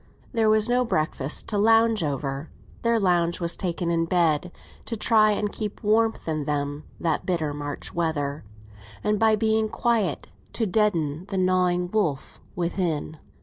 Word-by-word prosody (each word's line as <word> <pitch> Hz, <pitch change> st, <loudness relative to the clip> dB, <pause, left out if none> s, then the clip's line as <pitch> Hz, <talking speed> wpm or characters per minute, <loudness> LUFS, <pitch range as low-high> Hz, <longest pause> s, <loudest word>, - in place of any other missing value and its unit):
There 225 Hz, -2 st, +3 dB
was 215 Hz, 0 st, +4 dB
no 245 Hz, +1 st, +2 dB
breakfast 155 Hz, -, -2 dB
to 210 Hz, -, 0 dB
lounge 225 Hz, -1 st, +4 dB
over; 140 Hz, 0 st, -3 dB, 0.3 s
their 230 Hz, -1 st, +2 dB
lounge 175 Hz, -3 st, +1 dB
was 170 Hz, -1 st, 0 dB
taken 175 Hz, -2 st, -2 dB
in 165 Hz, 0 st, +1 dB
bed, 170 Hz, -1 st, +1 dB, 0.3 s
to 230 Hz, -, -4 dB
try 215 Hz, 0 st, +4 dB
and 210 Hz, 0 st, 0 dB
keep 210 Hz, -2 st, -5 dB
warmth 220 Hz, 0 st, +1 dB
in 155 Hz, -2 st, -2 dB
them 145 Hz, 0 st, -2 dB
that 165 Hz, -2 st, 0 dB
bitter 160 Hz, -5 st, -1 dB
March 145 Hz, 0 st, -5 dB
weather, 150 Hz, -4 st, -2 dB, 0.6 s
and, 210 Hz, -1 st, +1 dB
by 220 Hz, -1 st, +4 dB
being 220 Hz, 0 st, +1 dB
quiet, 215 Hz, -9 st, 0 dB, 0.3 s
to 225 Hz, -, 0 dB
deaden 175 Hz, -6 st, 0 dB
the 195 Hz, -1 st, -3 dB
gnawing 180 Hz, -1 st, +1 dB
wolf 165 Hz, -11 st, -1 dB
within. 170 Hz, -3 st, -2 dB
180 Hz, 150 wpm, -25 LUFS, 155-215 Hz, 0.6 s, was